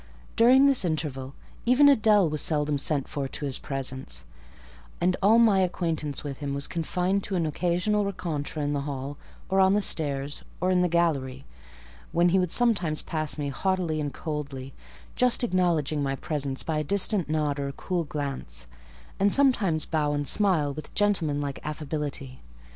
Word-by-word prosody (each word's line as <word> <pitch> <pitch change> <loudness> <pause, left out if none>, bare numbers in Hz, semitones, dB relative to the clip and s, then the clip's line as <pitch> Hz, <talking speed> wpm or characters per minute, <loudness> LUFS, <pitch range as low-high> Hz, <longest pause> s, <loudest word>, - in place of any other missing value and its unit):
During 255 +4 +6
this 275 -5 +3
interval, 145 -5 -3 0.3
even 255 +4 +5
Adèle 215 -8 +5
was 150 -1 -2
seldom 150 -2 +1
sent 140 -1 0
for 140 -2 -3
to 145 - -5
his 135 -1 -1
presence, 130 - -4 0.8
and 180 +1 +2
all 210 +4 +5
my 220 -4 +5
acquaintance 165 -5 -2
with 140 -3 -6
him 140 -2 -3
was 140 - -2
confined 180 +4 -1
to 195 - -3
an 170 -3 +1
occasional 180 +6 0
rencontre 165 -6 -4
in 145 0 -1
the 140 - -1
hall, 140 0 -5 0.3
on 190 0 +4
the - - +3
stairs, 145 -6 -1 0.2
or 185 +2 +1
in 180 -1 +3
the 180 - +2
gallery, 140 -6 0 0.7
when 175 +1 +3
he 190 +2 +3
would 180 -2 0
sometimes 200 -11 +2
pass 155 -2 -2
me 145 -1 -2
haughtily 170 0 -1
and 145 -1 -3
coldly, 140 -4 -6 0.4
just 250 0 +2
acknowledging 170 - +1
my 135 -1 -1
presence 140 -2 -3
by 155 -2 -1
a - - -1
distant 195 +1 +2
nod 150 -2 0
or 140 - -2
a - - -3
cool 175 +3 -2
glance, 135 - -4 0.5
and 200 +1 +3
sometimes 210 - +2
bow 150 -2 0
and 145 -1 -1
smile 165 -6 +2
with 155 +1 -9
gentlemanlike 150 -9 0
affability. 150 -3 -4
155 Hz, 165 wpm, -26 LUFS, 145-185 Hz, 0.8 s, During